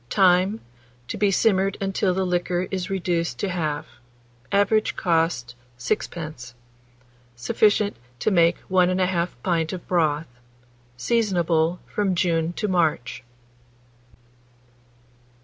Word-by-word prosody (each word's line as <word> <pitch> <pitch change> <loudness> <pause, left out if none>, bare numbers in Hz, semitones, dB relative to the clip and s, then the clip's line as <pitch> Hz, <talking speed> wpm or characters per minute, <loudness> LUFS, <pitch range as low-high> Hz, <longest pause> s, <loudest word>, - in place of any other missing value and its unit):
Time. 190 +2 +3 0.5
To - - -3
be 205 0 +2
simmered 195 -1 +2
until 195 -1 0
the 190 0 0
liquor 180 0 -1
is 190 +1 -3
reduced 175 -3 -1
to 200 - -2
half. 155 -5 -2 0.7
Average 210 +2 +2
cost, 165 - 0 0.2
6d. 125 0 -4 0.8
Sufficient 205 - +2 0.2
to 215 - 0
make 170 -2 +4
1 180 -1 +2
1/2 185 -1 0
pint 165 -2 0
of 180 - -7
broth. 160 -3 +1 0.7
Seasonable 175 - +1
from 200 -3 -1
June 170 -2 +1
to 210 - -2
March. 160 - 0
180 Hz, 105 wpm, -24 LUFS, 165-195 Hz, 0.8 s, make